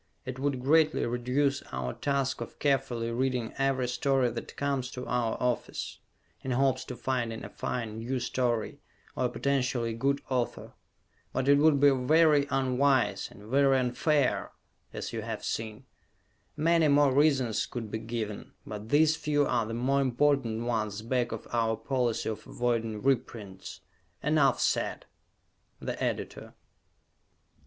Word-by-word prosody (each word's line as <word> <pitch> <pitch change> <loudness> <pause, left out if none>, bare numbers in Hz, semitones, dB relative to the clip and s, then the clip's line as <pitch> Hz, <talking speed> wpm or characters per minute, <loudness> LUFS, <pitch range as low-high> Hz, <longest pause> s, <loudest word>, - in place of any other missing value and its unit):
It 130 0 -6
would 135 -2 -1
greatly 155 +3 +3
reduce 125 +4 0
our 65 -1 -3
task 140 -2 -1
of - - -7
carefully 125 -5 0
reading 125 -1 -1
every 135 -2 +1
story 130 0 +1
that - - -7
comes 140 -3 -1
to 125 - -6
our 120 -2 0
office, 125 -1 -2 0.4
in 130 - -4
hopes 130 0 +2
to 125 - -6
finding 120 -2 -2
a - - -8
fine, 110 -3 -4
new 125 +3 -2
story, 120 -2 -1 0.4
or - - 0
a - - +1
potentially 125 -4 0
good 140 +5 0
author. 125 -3 -2 0.6
But 130 0 -1
it 140 0 +6
would 150 -1 +5
be 145 0 +6
very 145 +2 +4
unwise, 135 0 +1
and 100 - -15
very 135 +4 +3
unfair, 130 +3 +1 0.4
as - - -6
you - - -3
have - - -5
seen. 110 +2 -4 0.7
Many 165 +1 +3
more 145 -2 +4
reasons 135 -6 +2
could 115 -4 -6
be 110 - -2
given, 110 -2 -5
but 105 +1 -7
these 155 +3 +4
few 145 -2 +1
are 120 -4 0
the 115 - -4
more 135 +4 +1
important 130 -3 +1
ones 110 -3 -2
back 120 +1 0
of 115 - -6
our 115 -1 +1
policy 125 -1 -1
of 110 - -5
avoiding 115 -3 -1
reprints. 110 -7 -2 0.4
Enough 150 -2 +3
said! - - 0 0.7
_The - - -4
Editor. - - -3
130 Hz, 145 wpm, -29 LUFS, 115-140 Hz, 0.7 s, it